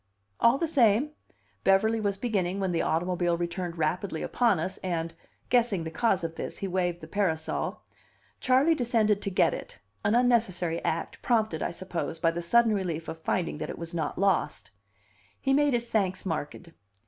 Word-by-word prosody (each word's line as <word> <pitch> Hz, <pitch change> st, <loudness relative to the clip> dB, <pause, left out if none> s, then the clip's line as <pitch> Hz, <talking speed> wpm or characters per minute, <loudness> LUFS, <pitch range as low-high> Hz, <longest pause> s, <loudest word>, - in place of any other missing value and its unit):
"All 235 Hz, +3 st, +5 dB
the 330 Hz, -, 0 dB
same," 255 Hz, -1 st, +3 dB, 0.5 s
Beverly 220 Hz, +4 st, +3 dB
was 200 Hz, -2 st, -1 dB
beginning, 195 Hz, -4 st, -1 dB
when 190 Hz, -2 st, 0 dB
the 170 Hz, -, +1 dB
automobile 175 Hz, +1 st, 0 dB
returned 175 Hz, 0 st, -3 dB
rapidly 160 Hz, +2 st, -1 dB
upon 230 Hz, -8 st, +2 dB
us, 185 Hz, +4 st, -3 dB
and, 165 Hz, -2 st, -3 dB, 0.4 s
guessing 235 Hz, -8 st, +2 dB
the 160 Hz, -, -5 dB
cause 190 Hz, 0 st, +1 dB
of 165 Hz, -1 st, -3 dB
this, -, -, -6 dB
he 195 Hz, -, -3 dB
waved 175 Hz, -2 st, -1 dB
the -, -, -9 dB
parasol. 170 Hz, -6 st, -1 dB, 0.6 s
Charley 265 Hz, +5 st, +4 dB
descended 225 Hz, -7 st, +1 dB
to -, -, -1 dB
get 185 Hz, -, +3 dB
it -, -, -7 dB, 0.3 s
an 210 Hz, -, +2 dB
unnecessary 220 Hz, -9 st, +2 dB
act, 165 Hz, -, -2 dB
prompted, 220 Hz, -9 st, +1 dB
I -, -, 0 dB
suppose, 170 Hz, -2 st, -4 dB
by 165 Hz, +1 st, +2 dB
the 170 Hz, +1 st, -4 dB
sudden 230 Hz, +6 st, +4 dB
relief 170 Hz, -5 st, -2 dB
of 160 Hz, -, -6 dB
finding 165 Hz, -2 st, -1 dB
that -, -, -4 dB
it -, -, -6 dB
was 170 Hz, +1 st, -6 dB
not 160 Hz, -3 st, -2 dB
lost. 175 Hz, -, 0 dB, 0.7 s
He 270 Hz, -, +1 dB
made 290 Hz, -2 st, +3 dB
his 235 Hz, 0 st, -1 dB
thanks 195 Hz, -5 st, 0 dB
marked. 165 Hz, 0 st, -4 dB
190 Hz, 175 wpm, -28 LUFS, 170-225 Hz, 0.7 s, All